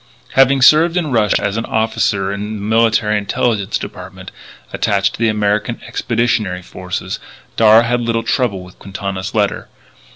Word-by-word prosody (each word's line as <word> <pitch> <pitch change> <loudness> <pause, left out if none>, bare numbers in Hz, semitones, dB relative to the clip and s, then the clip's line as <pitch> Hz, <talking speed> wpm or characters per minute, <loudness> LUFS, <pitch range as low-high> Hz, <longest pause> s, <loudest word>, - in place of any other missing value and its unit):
Having 135 0 +4
served 165 +5 +5
in 160 -5 -1
Russia 110 -4 +1
as 100 +1 -1
an 115 - -2
officer 110 -3 0
in 105 +2 -5
the 105 - -7
Military 110 -1 +2
Intelligence 100 0 -1
Department - - -9 0.4
attached 100 -1 0
to - - -10
the 115 -1 +2
American 105 +2 -1
Expeditionary 115 -6 -1
Forces, 90 +1 -6 0.4
Darragh 110 +1 +6
had 120 +1 0
little 115 -1 -1
trouble 115 -6 -1
with 90 0 -16
Quintana's 95 +1 -5
letter. 105 -2 -1
110 Hz, 150 wpm, -17 LUFS, 100-115 Hz, 0.4 s, Darragh